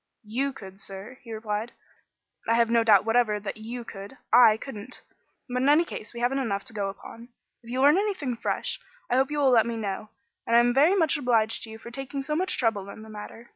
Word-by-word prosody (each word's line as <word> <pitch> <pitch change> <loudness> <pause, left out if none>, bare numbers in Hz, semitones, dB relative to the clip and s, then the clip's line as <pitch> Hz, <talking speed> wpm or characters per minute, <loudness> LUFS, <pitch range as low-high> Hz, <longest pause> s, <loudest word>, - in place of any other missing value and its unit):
"You 260 +6 -1
could, 195 -6 -12
sir," 200 +7 -9
he 230 - -11
replied. 220 +1 -3 0.7
"I 230 - +3
have 230 0 +3
no 230 -1 +4
doubt 210 -3 +5
whatever 225 -2 +2
that 205 0 -6
you 235 +3 -6
could. 200 -3 -10 0.2
I 230 -3 +7
couldn't. 230 -1 -8 0.4
But, 250 0 -2
in 270 - +3
any 310 +4 +5
case, 220 - -7
we 235 - -7
haven't 255 +3 +1
enough 200 -6 -2
to - - -7
go 200 -2 -2
upon. 230 +4 -11 0.3
If 235 - -15
you 255 +2 -1
learn 295 +6 +6
anything 370 - -2
fresh, - - -2 0.3
I - - +3
hope 265 0 +3
you 295 - -3
will 275 -3 +4
let 230 -2 +5
me 235 -1 -3
know; 210 0 -4 0.4
and 230 - +3
I - - +8
am 240 0 +3
very 300 +9 +5
much 325 -4 +2
obliged 230 -5 +1
to - - -12
you 220 - -9
for 235 +1 -11
taking 270 +2 -5
so 300 +2 -2
much 370 +4 0
trouble 210 -5 0
in 215 - -10
the 220 - -12
matter. 215 +2 -10
235 Hz, 235 wpm, -26 LUFS, 215-265 Hz, 0.7 s, I